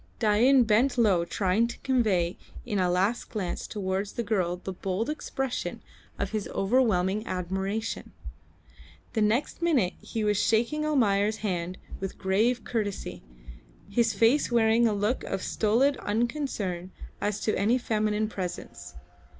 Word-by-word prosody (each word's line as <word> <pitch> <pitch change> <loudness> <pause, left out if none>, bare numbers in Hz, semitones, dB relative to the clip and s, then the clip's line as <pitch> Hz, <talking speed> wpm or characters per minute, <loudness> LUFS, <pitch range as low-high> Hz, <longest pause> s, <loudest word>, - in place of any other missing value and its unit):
Dain 240 +4 +5
bent 235 +4 +2
low 195 -7 +3
trying 195 +5 +1
to 235 - -7
convey 205 -10 +1 0.3
in 210 -5 -1
a 180 -1 +2
last 190 +6 0
glance 195 -5 -3
towards 195 -1 -2
the 235 - -2
girl 190 -5 0
the 190 +1 -6
bold 195 +8 -2
expression 270 -4 -4 0.3
of - - -2
his 215 -2 -2
overwhelming 205 -2 +1
admiration. 190 +4 -3 1.0
The 220 - 0
next 230 +10 +1
minute 270 - +2
he 225 -2 -3
was 210 -1 +2
shaking 240 +8 +1
Almayer's 215 -7 +2
hand 180 -2 -2 0.2
with 195 -1 -5
grave 220 +6 +1
courtesy, 210 -5 -3 0.7
his 230 +2 +3
face 245 +5 +3
wearing 230 0 +4
a 215 - +1
look 210 +5 0
of 195 - -3
stolid 245 +7 +2
unconcern 210 - -2 0.3
as 205 0 -1
to 215 - 0
any 220 +6 +2
feminine 215 -2 0
presence. 185 -4 -6
215 Hz, 135 wpm, -27 LUFS, 190-235 Hz, 1.0 s, Dain